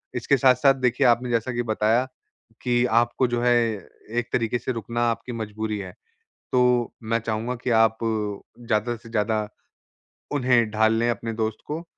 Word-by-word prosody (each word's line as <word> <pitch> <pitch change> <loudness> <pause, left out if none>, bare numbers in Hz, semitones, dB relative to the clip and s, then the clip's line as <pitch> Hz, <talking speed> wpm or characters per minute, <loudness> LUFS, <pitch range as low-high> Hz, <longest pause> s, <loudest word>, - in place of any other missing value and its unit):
इसके 135 +3 +2
साथ-साथ 130 +2 +5
देखिए 125 0 +2
आपने 120 +1 +2
जैसा 120 +1 0
कि 120 0 -1
बताया 110 +2 +1 0.6
कि 120 0 +2 0.2
आपको 120 +2 0
जो 120 0 -1
है 120 0 +4 0.7
एक 120 - -5
तरीक़े 120 0 0
से 130 - -3
रुकना 115 0 -3
आपकी 125 - -6
मजबूरी 110 -1 -4
है। 95 -2 -7 0.6
तो 125 - +3 0.4
मैं 115 +1 0
चाहूँगा 115 +2 -3
कि - - -1
आप 110 0 +1
ज़्यादा 110 +2 -2
से 115 - -15
ज़्यादा 110 -1 0 0.9
उन्हें 125 -4 +3
ढाल 110 0 +3
लें 120 +1 +1
अपने 115 -1 -3
दोस्त 110 -1 -2
को, 160 +3 -4
115 Hz, 160 wpm, -24 LUFS, 110-125 Hz, 0.9 s, साथ-साथ